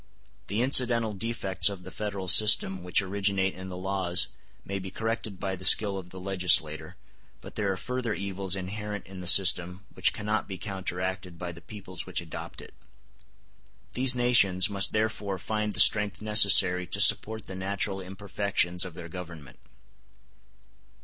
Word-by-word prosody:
The 105 +5 -2
incidental 120 -4 +3
defects 100 -3 -1
of 95 -3 -9
the 95 - -11
Federal 100 -3 -6
system 95 0 +4
which 90 +2 +1
originate 95 -1 -2
in 95 +1 -10
the 90 - -8
laws 90 -1 0 0.4
may 100 0 -5
be 95 0 -8
corrected 110 -1 -5
by 95 -1 -4
the 95 - -12
skill 100 +1 +5
of 90 -1 -13
the 95 - -11
legislator, 90 -5 +2 0.4
but - - -13
there 100 -2 -2
are 95 - -4
further 125 0 -4
evils 95 -1 -4
inherent 105 +2 -7
in 95 0 -12
the 90 - -6
system 90 0 +3
which - - +1
cannot 105 +1 -4
be 95 - -7
counteracted 95 -2 -6
by 90 0 -6
the 85 0 -14
peoples 95 -2 -9
which - - -3
adopt - - -9
it. - - -15 1.2
These 130 0 +5
nations 105 -6 +2
must 100 -1 -1
therefore 110 -3 -3
find 105 +2 -4
the - - -1
strength 105 -2 +4
necessary 100 -4 +5
to 100 - -3
support 110 +1 +4
the - - -10
natural 95 0 -4
imperfections 95 -2 -3
of 90 -3 -9
their 85 -1 -9
Government. 85 -7 -11
95 Hz, 160 wpm, -26 LUFS, 90-105 Hz, 1.2 s, skill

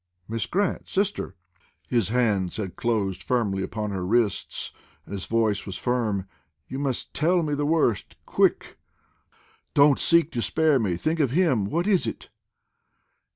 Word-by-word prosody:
"Miss 115 +1 -2
Grant, 200 0 -1
sister!" 195 - -1 0.5
His 115 -5 +1
hands 105 -7 +1
had 95 -4 -4
closed 105 -5 -1
firmly 105 -6 0
upon 105 +1 -3
her 95 -2 -3
wrists, 110 +2 0 0.3
and - - -9
his 95 -2 -4
voice 110 -3 +1
was 95 - -4
firm. 110 -6 -1 0.4
"You 135 - -5
must 135 -3 -3
tell 170 +3 +2
me 150 -2 -1
the 145 0 0
worst, 150 -9 +1
quick. - - +1 1.0
Don't 140 -1 +6
seek 170 -2 +4
to 120 - -2
spare 155 +1 +3
me; 95 -7 0
think 160 - -1
of 140 -4 +3
him! 135 - +2
What 170 - -1
is 200 -4 +2
it?" - - -6
120 Hz, 155 wpm, -25 LUFS, 100-155 Hz, 1.0 s, Don't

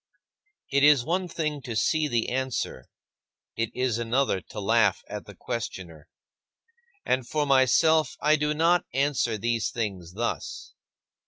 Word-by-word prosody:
It 140 0 +3
is 145 -4 +6
one 180 +2 0
thing 155 -3 -3
to 120 -3 -6
see 155 +7 +1
the 120 -5 0
answer; 130 0 -3 0.7
it 115 0 -1
is 125 -3 0
another 120 -3 0
to 105 - -7
laugh 105 -1 +2
at - - -7
the - - -11
questioner 95 -10 -6 1.0
and 130 -1 0
for 150 +1 0
myself 140 +3 +3
I 150 +1 +4
do 150 0 0
not 170 +3 +3
answer 135 -5 +1
these 115 0 -1
things 95 -7 -4
thus. 115 +4 -4
130 Hz, 140 wpm, -26 LUFS, 115-150 Hz, 1.0 s, is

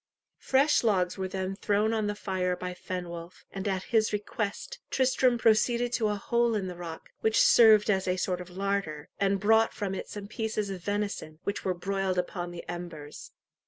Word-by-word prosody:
Fresh 275 +2 +3
logs 185 -5 +2
were 190 -1 -3
then 190 0 -3
thrown 210 +2 +1
on 215 -2 0
the 205 - -2
fire 185 -3 -1
by 180 0 -5
Fenwolf, 175 -1 -7
and, 195 +1 -4
at 190 -1 -1
his 220 -1 +4
request, 210 - -3
Tristram 255 -1 +2
proceeded 235 +2 +2
to 225 -3 +1
a 210 - 0
hole 235 +2 +1
in 200 -3 -1
the 180 -1 -5
rock, 170 -2 -8
which 220 0 +2
served 220 -3 +7
as 190 -3 +1
a 180 0 +1
sort 180 -1 -1
of 180 - -9
larder, 185 -5 -2
and 195 0 +2
brought 220 +3 +3
from 200 -3 -3
it 190 - -5
some 205 -1 -7
pieces 215 -2 -2
of 185 -2 -6
venison, 205 -6 -3
which 200 - -3
were 185 -1 0
broiled 195 +1 -1
upon 175 0 -2
the 175 0 -9
embers. 170 -4 -7
195 Hz, 190 wpm, -28 LUFS, 180-215 Hz, -, served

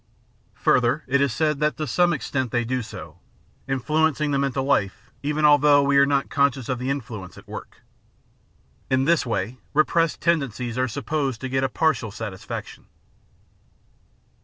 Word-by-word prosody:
Further, 125 +4 +2
it 140 +1 +1
is 140 -2 +2
said 150 +3 0
that 150 0 0
to 155 - -2
some 175 +2 +2
extent 130 -5 -2
they 120 +1 0
do 130 +2 -1
so, 85 -6 -10 0.5
influencing 150 +3 +1
the 140 - +1
mental 135 -1 0
life 105 -5 -1
even 150 +1 0
although 145 -1 +6
we 140 0 +2
are 140 - +5
not 140 -1 +1
conscious 140 -3 +1
of 130 -2 -1
the 130 +1 -3
influence 115 -9 -5
at - - -14
work. - - -10 1.1
In 130 0 +2
this 165 -3 +2
way 115 +3 -2 0.2
repressed 165 +1 +2
tendencies 130 -8 -1
are 130 0 +1
sup 135 +4 -6
posed 140 -6 -1
to 130 - -4
get 130 +1 0
a 135 - +1
partial 130 -6 0
satisfaction. 100 -2 -7
135 Hz, 160 wpm, -23 LUFS, 120-150 Hz, 1.1 s, although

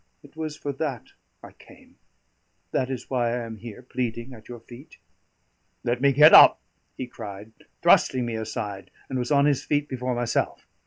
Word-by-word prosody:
It 145 +1 -18
was 155 -1 -5
for 145 -2 -5
that 135 -4 -4 0.3
I - - -11
came; - - -20 0.7
that 130 - -1
is 130 -3 -5
why 120 -3 0
I 120 - -4
am 110 -1 -8
here 115 +2 -10
pleading 120 0 -4
at 110 -1 -15
your 120 -1 -8
feet." 120 +5 -14 0.9
"Let 120 +1 -1
me 140 0 +4
get 150 +3 +7
up," - - +9 0.4
he 130 - -4
cried, 105 -3 -10 0.3
thrusting 125 -2 +4
me 120 - -4
aside, 110 -3 -5 0.2
and 130 - -1
was 125 +2 -3
on 140 -1 +4
his 145 -3 +1
feet 145 -1 -1
before 125 -2 -3
myself. 120 -1 -2
125 Hz, 175 wpm, -25 LUFS, 115-140 Hz, 0.9 s, up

